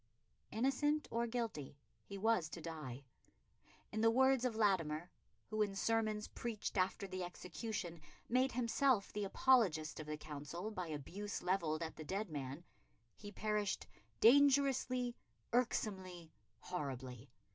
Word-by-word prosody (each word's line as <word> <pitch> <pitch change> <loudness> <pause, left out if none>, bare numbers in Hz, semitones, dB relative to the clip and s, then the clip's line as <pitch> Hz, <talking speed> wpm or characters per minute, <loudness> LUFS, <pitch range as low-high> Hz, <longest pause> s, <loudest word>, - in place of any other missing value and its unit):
Innocent 275 +6 +1
or 235 +1 +1
guilty, 225 - -3 0.2
he 200 - -8
was 200 -6 +2
to 170 - -7
die. 150 -5 -6 0.9
In 215 - -1
the 225 - +6
words 260 +1 +4
of 240 -3 0
Latimer 175 -6 +1 0.4
who, 215 0 0
in 200 -2 +1
sermons 215 0 +1
preached 230 -3 -4
after 190 +1 +1
the 185 -1 -4
execution, 180 -1 -5 0.3
made 255 +2 +2
himself 245 -2 +2
the 210 -1 -1
apologist 195 -10 +3
of 155 - -6
the 150 0 -3
Council 155 +7 -5
by 185 -5 -4
abuse 170 +7 -5
levelled 170 -4 +1
at 160 - -6
the 155 - -6
dead 195 +3 -3
man 140 +2 -4 0.5
he 205 -1 -9
perished 210 -1 -1 0.3
"dangerously, 260 -1 +5 0.4
irksomely, 190 -8 -1 0.3
horribly.... 130 -7 -5
200 Hz, 130 wpm, -38 LUFS, 160-230 Hz, 0.9 s, the